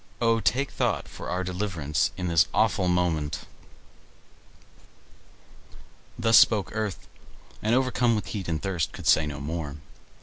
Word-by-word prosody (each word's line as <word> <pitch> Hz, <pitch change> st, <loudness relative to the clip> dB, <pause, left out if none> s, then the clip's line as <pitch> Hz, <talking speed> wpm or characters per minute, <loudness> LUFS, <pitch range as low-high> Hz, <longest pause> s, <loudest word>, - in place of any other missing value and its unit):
O, 115 Hz, -1 st, +2 dB
take 135 Hz, +4 st, 0 dB
thought -, -, -1 dB
for -, -, -8 dB
our 90 Hz, +1 st, -1 dB
deliverance 90 Hz, -5 st, -1 dB
in 90 Hz, -, -3 dB
this 85 Hz, -2 st, +4 dB
awful 100 Hz, -4 st, +2 dB
moment!" 85 Hz, -4 st, 0 dB, 2.8 s
Thus 115 Hz, 0 st, +6 dB
spoke 105 Hz, -4 st, +3 dB
Earth, 110 Hz, -3 st, -3 dB, 0.5 s
and 110 Hz, +3 st, +2 dB
overcome 125 Hz, -2 st, +2 dB
with 105 Hz, -, -3 dB
heat 100 Hz, -5 st, -5 dB
and 80 Hz, -2 st, -1 dB
thirst, 85 Hz, -5 st, -2 dB
could -, -, -9 dB
say 80 Hz, -, +4 dB
no 75 Hz, -, -5 dB
more. 75 Hz, 0 st, -4 dB
95 Hz, 135 wpm, -26 LUFS, 80-110 Hz, 2.8 s, Thus